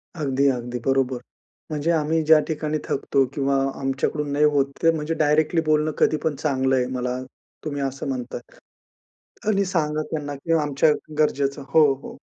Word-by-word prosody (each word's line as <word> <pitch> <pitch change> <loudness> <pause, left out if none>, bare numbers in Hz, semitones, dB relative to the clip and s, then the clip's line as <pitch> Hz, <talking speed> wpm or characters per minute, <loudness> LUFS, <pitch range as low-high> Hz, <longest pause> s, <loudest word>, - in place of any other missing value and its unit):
अगदी, 140 -3 +1
अगदी 125 -1 -3
बरोबर. 135 -2 +1 0.5
म्हणजे 150 +2 0
आम्ही 160 0 +1
ज्या 155 0 +7
ठिकाणी 155 -1 -2
थकतो 135 0 +1
किंवा 140 -1 0 0.2
आमच्याकडून 140 +2 -1
नाही 150 +1 +3
होत, 140 -2 +2
ते 165 - +5
म्हणजे 160 0 -2
डायरेक्टली 155 +1 +2
बोलणं 155 0 +2
कधीपण 155 -1 +1
चांगलंय, 130 -3 +1
मला 125 0 -2 0.5
तुम्ही 145 -2 -3
असं 135 0 -3
म्हणताय. 130 -3 -4 1.1
आणि 200 -2 +2
सांगा 155 -4 0
त्यांना 145 -2 -3
की 165 +4 -2
आमच्या 145 +1 +2 0.3
गरजेचं 140 -2 +1
हो, 150 -1 +5
हो. - - -10
145 Hz, 145 wpm, -23 LUFS, 135-155 Hz, 1.1 s, ज्या